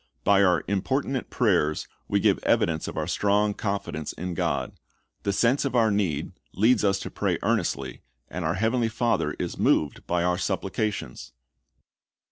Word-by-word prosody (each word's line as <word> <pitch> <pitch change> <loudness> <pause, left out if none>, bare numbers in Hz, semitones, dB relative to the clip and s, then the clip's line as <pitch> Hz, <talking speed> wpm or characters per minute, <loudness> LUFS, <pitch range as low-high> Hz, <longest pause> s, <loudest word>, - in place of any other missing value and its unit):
By 100 -1 +5
our 90 -3 +3
importunate 130 +7 -1
prayers 90 -10 +1 0.2
we - - +1
give - - +3
evidence 80 -1 +1
of - - -6
our 80 - 0
strong 105 +4 +1
confidence 100 -8 -3
in 90 +1 -5
God. - - -1 0.5
The 100 - 0
sense 120 +7 +2
of 140 -2 -2
our 115 -2 +4
need 95 -8 -1 0.2
leads 110 +4 +3
us 100 -1 +3
to - - -6
pray - - 0
earnestly, - - -1 0.3
and 90 +1 -5
our 80 +2 0
Heavenly 115 +3 +1
Father 115 -1 0
is - - -4
moved 75 -3 +1
by 85 0 +1
our 90 0 +1
supplications. 100 - -3
100 Hz, 155 wpm, -26 LUFS, 90-110 Hz, 0.5 s, By